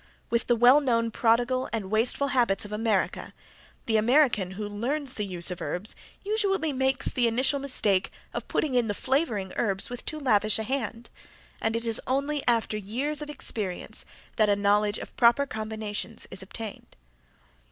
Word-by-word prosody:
With 235 0 +1
the 240 - +4
well 245 +5 +6
known 230 -4 +1
prodigal 240 +3 +1
and 210 -4 -4
wasteful 245 +6 +2
habits 235 -7 +1
of 205 - -10
America 210 -2 -1 0.5
the 220 -1 +2
American 235 -4 +3
who 210 -1 -3
learns 255 +7 -1
the 210 -2 -3
use 180 -1 +2
of 180 - -6
herbs 190 +5 -2 0.3
usually 390 -7 0
makes 265 0 +1
the 245 -2 +2
initial 260 +5 +2
mistake 210 -8 +2 0.2
of - - -5
putting 295 -4 -1
in 245 -2 +2
the 205 - -2
flavoring 235 - -1
herbs 200 -1 0
with 245 - -6
too 310 - -4
lavish 215 -6 +3
a 220 - -2
hand, 235 -1 -4 0.5
and 225 0 0
it 230 +1 -1
is 225 -1 +2
only 280 +3 0
after 230 -3 +1
years 260 +9 -3
of 300 - -6
experience 210 -10 -3 0.3
that 215 -2 +4
a 205 - +4
knowledge 205 +1 +2
of - - -9
proper 240 +4 +5
combinations 220 -2 -5
is 190 - -5
obtained. 210 +2 -9
230 Hz, 170 wpm, -27 LUFS, 210-265 Hz, 0.5 s, well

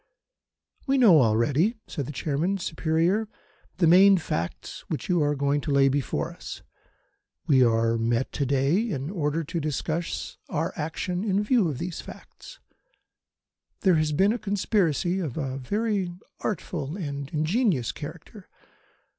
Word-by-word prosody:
"We 270 0 +3
know 195 - +7
already," 130 - +2
said 140 -5 -5
the - - -5
Chairman, 155 +7 -1
superior, 170 +5 0 0.5
"the 180 - +3
main 190 +4 +7
facts 85 - -4
which - - -3
you 175 -3 +2
are 145 0 +1
going 140 +1 0
to 145 - -3
lay 135 -1 +5
before 140 0 -1
us. - - -9 0.8
We 130 -3 +5
are 115 -1 +2
met 115 +3 0
to 140 - -1
day 140 +6 +2
in 140 -3 -3
order 160 -3 -1
to 165 +3 -3
discuss 155 +2 -3
our 160 +2 -2
action 175 +4 -3
in 205 -1 +1
view 215 -3 +3
of 140 - -4
these 170 +4 -5
facts. - - -13 1.2
There 190 -5 +4
has 155 -1 +1
been 195 +8 +3
a 240 - -3
conspiracy 195 -3 0
of 155 -8 -4
a 135 -3 -3
very 200 - -1 0.3
artful 165 -5 -3
and 140 -6 -5
ingenious 160 - +1
character. - - -10
160 Hz, 145 wpm, -26 LUFS, 140-190 Hz, 1.2 s, know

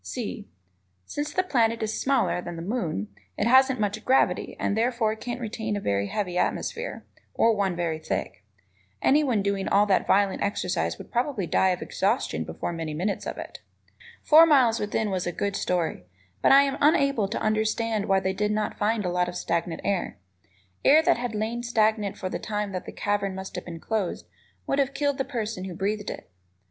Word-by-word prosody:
(c) 215 -4 -5 0.6
Since 295 - -4
the 370 - +2
planet 230 -9 +1
is 215 0 -2
smaller 265 -9 +1
than 175 -1 -7
the 165 - -6
moon, 170 - -2 0.3
it - - 0
hasn't 260 +2 +5
much 210 +1 -1
gravity 265 - +2
and 200 - 0
therefore 225 -1 +1
can't 240 +2 -5
retain 220 -2 -3
a - - -2
very 100 - 0
heavy 180 - -2
atmosphere, 475 +2 -2 0.3
or 230 -1 +4
one 195 -3 0
very 170 -2 -2
thick. 95 -11 -4 0.6
Anyone 265 -8 +3
doing 200 -1 -1
all 205 +1 +4
that 195 -2 +2
violent 200 0 +2
exercise 175 - -1
would - - -12
probably 240 -5 -1
die 190 +3 +2
of 180 -1 -1
exhaustion 215 +7 -1
before - - -5
many 160 -2 -4
minutes 195 +6 -2
of - - -5
it. - - -8 0.6
"Four 320 +2 +8
Miles 255 -7 +4
Within" 210 0 -1
was 185 -2 -2
a - - 0
good 200 +3 -2
story, 175 - -1 0.4
but - - +4
I 275 +1 +8
am 275 0 -2
unable 275 -7 +3
to 210 - -3
understand 215 0 0
why 195 0 +4
they 190 0 -1
did 210 +2 0
not 210 0 -2
find 210 0 +1
a 180 - 0
lot 180 0 +1
of 175 - -8
stagnant 170 -1 -2
air. 195 -3 -1 0.7
Air 310 +3 +6
that 345 -5 +3
had 240 -2 -3
lain 225 +3 -2
stagnant 220 -4 +1
for 185 - -4
the - - -4
time 210 -1 -3
that 185 -1 -5
cavern 200 -2 -1
must 190 0 -7
have 180 - -5
been 165 -2 -7
closed 210 -1 -2 0.4
would 275 - 0
have 275 0 0
killed 285 -1 0
the - - +2
person 225 -7 -4
who 185 -2 -6
breathed 205 +3 -2
it. - - -8
210 Hz, 195 wpm, -26 LUFS, 190-240 Hz, 0.7 s, Four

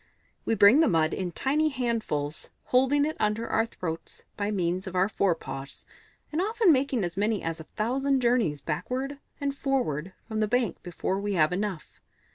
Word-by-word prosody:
We 225 - +2
bring 205 +7 +7
the 320 - +5
mud 160 -4 +2
in 180 -2 -2
tiny 300 - +1
handfuls, 225 - -2
holding 265 +3 +3
it 310 - -2
under 215 +2 0
our 225 +1 +1
throats 165 -7 -6
by 205 0 -2
means 185 -2 -1
of 185 - -6
our 185 +1 +3
forepaws, 140 -9 -2 0.5
and 310 +3 0
often 435 -1 +3
making 265 -5 +2
as 175 0 -3
many 210 0 +1
as 165 0 -3
a 160 - -9
thousand 265 +5 +1
journeys 235 - +1
backward 255 - -3 0.2
and 280 -1 -2
forward 195 - -1
from 220 -1 -3
the 215 - +2
bank 235 -4 0
before 180 +2 -2
we 205 0 -2
have 160 -2 +3
enough. 190 -3 -4
210 Hz, 175 wpm, -27 LUFS, 175-265 Hz, 0.5 s, bring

